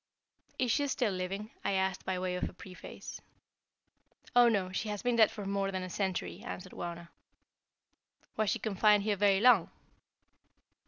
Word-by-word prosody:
"Is 250 -3 +1
she 285 +3 +1
still 250 -5 0
living?" 195 +3 -4
I 200 - 0
asked 190 -1 -1
by 190 -1 -1
way 180 0 -2
of 180 - -2
a - - -14
preface. 185 -1 -10 1.1
"Oh, 245 -1 +7
no, 195 -5 0
she 210 +3 -3
has 205 -1 -4
been 245 -1 +1
dead 220 -2 +6
for 205 - -7
more 195 0 -1
than 185 -1 -3
a 185 - -6
century," 190 -1 -2
answered 185 -6 -7
Wauna. 170 0 -6 1.3
"Was 215 -2 +1
she - - +1
confined 210 -1 +3
here 210 -1 +1
very 200 -1 +3
long?" 235 -7 +6
195 Hz, 165 wpm, -32 LUFS, 185-215 Hz, 1.3 s, Oh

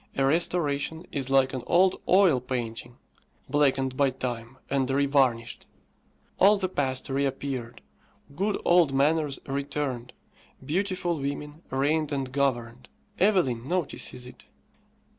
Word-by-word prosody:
A 135 - +3
restoration 160 +1 0
is 135 -2 -3
like 135 -1 +3
an 130 - -3
old 185 +2 +3
oil 185 -8 +5
painting, 120 -1 -5 0.5
blackened 135 -2 +1
by 140 0 +3
time, 125 -1 -5
and 135 -2 0
revarnished. 135 -4 +1 0.7
All 205 +3 +6
the 190 -1 -1
past 130 -7 -1
reappeared, 135 -3 -3 0.5
good 200 +4 -1
old 170 -6 +4
manners 150 0 +2
returned, 135 -3 -3 0.5
beautiful 180 0 -1
women 145 +2 -5
reigned 150 +3 0
and 135 -2 -2
governed. 125 -3 -1 0.3
Evelyn 170 - +2
notices 165 -7 -2
it. 125 - -13
140 Hz, 115 wpm, -27 LUFS, 130-160 Hz, 0.7 s, All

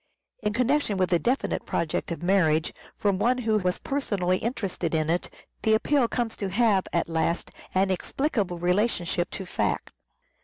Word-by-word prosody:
In 210 -1 0
connection 250 -2 +1
with 185 -1 +1
a 170 - +4
definite 255 +8 0
project 165 -2 -2
of 170 - -4
marriage, 165 -4 +2 0.2
from 200 -2 +1
one 245 +4 +3
who 220 -3 +1
was 180 -2 0
personally 195 -10 0
interested 195 -8 -2
in 155 0 +1
it, 175 - -1 0.3
the 220 0 +4
appeal 270 +2 +2
comes 235 -1 -2
to 200 - -2
have, 200 -1 +2
at 170 - 0
last, 165 +1 -1 0.2
an 190 +1 +3
explicable 200 - -1
relationship 180 -1 +1
to 190 - -6
fact. - - -1
195 Hz, 160 wpm, -26 LUFS, 175-230 Hz, 0.3 s, a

